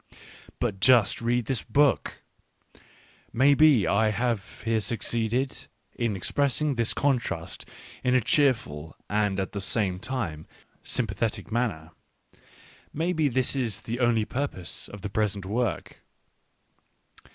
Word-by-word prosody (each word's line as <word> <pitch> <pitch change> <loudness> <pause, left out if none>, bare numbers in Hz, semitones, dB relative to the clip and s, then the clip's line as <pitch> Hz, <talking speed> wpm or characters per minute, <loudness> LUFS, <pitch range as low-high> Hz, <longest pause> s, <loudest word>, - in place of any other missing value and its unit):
But 105 -6 -1
just 120 -3 +4
read 120 0 +1
this 130 0 -1
book! 145 -3 +1 1.1
Maybe 140 - +5
I 110 +4 +3
have 115 -1 -2
here 115 -1 +1
succeeded 115 +3 -1 0.3
in 115 -3 -1
expressing 140 +8 0
this 115 -3 +2
contrast 120 -11 -1 0.4
in 125 0 +2
a - - +6
cheerful 105 - +1 0.2
and 105 -2 +1
at 95 - -2
the 100 - -4
same 95 -2 -1
time 100 - -4 0.3
sympathetic 110 -1 -2
manner 105 -10 -2 0.5
— - - -25 0.3
maybe 160 -1 0
this 130 0 0
is 120 -7 -1
the 120 +2 -4
only 120 -3 +2
purpose 125 -10 -4
of 105 -2 -11
the 105 - -3
present 105 -3 -1
work. 110 -2 -2
115 Hz, 120 wpm, -27 LUFS, 100-130 Hz, 1.1 s, a